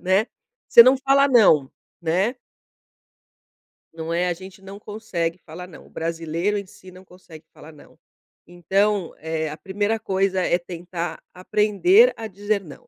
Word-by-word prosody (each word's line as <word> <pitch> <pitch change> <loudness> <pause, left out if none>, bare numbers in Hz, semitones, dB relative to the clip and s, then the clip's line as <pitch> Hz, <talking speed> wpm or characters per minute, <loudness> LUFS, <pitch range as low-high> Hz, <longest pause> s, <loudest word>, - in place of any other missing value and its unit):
né." 190 +4 +2 0.4
Você - - +8
não 260 +1 +5
fala 275 +1 +3
"não", 160 - +4 0.3
né. 185 +9 0 1.6
Não 165 0 -5
é, 175 +1 0
a 175 - 0
gente 190 +2 -13
não 195 +1 -11
consegue 185 -6 -4
falar 180 +3 -9
não, 175 - -14
o - - -19
brasileiro 165 +4 -3
em 200 - -5
si 185 0 -16
não 185 +1 -15
consegue 170 -3 -16
falar 155 +2 -14
não. 150 - -19 0.5
Então, 190 +2 -1
eh, 160 0 -3
a 150 - -8
primeira 205 +4 -2
coisa 190 -2 0
é 175 - +1
tentar 175 0 -6
aprender 215 - +3
a 225 - -6
dizer 205 +1 -2
não. 150 -5 -14
185 Hz, 155 wpm, -22 LUFS, 170-210 Hz, 1.6 s, Você